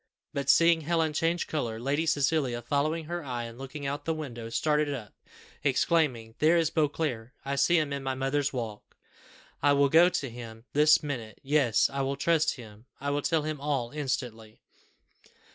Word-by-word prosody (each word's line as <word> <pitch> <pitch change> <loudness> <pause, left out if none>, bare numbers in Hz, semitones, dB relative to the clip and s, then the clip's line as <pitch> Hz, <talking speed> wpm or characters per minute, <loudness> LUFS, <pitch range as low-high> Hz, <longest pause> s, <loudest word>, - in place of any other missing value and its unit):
But 140 -1 -2
seeing 165 +3 +5
Helen 160 0 0
change 165 +3 0
colour, 115 -8 -3
Lady 145 +6 -1
Cecilia, 140 -5 +1
following 150 +6 0
her 175 +1 -4
eye, 125 -3 -4
and 115 +1 -9
looking 135 +2 -7
out 140 +1 -2
of 145 - -33
the 160 - 0
window, 120 -7 -6
started 150 +4 +1
up, 115 -7 -6 0.5
exclaiming, 135 -5 +1
"There 160 +3 +4
is 165 -2 +1
Beauclerc; 145 -6 -1
I 140 0 -1
see 175 +5 +3
him 150 -3 0
in 140 - -3
my 135 -1 -2
mother's 135 +2 0
walk. 115 -5 -6 0.6
I 145 - +4
will 140 0 +4
go 170 +4 +6
to 145 -6 -2
him 115 -1 -10
this 150 +2 +5
minute; 120 -7 -5
yes, 140 -5 +3
I 140 - -3
will 135 +1 -1
trust 160 +2 +2
him 110 -2 -13
I 145 +1 -2
will 145 +1 0
tell 160 0 +1
him 155 -2 -4
all 140 -5 -1
instantly." 125 -7 -4
140 Hz, 180 wpm, -28 LUFS, 125-155 Hz, 0.6 s, go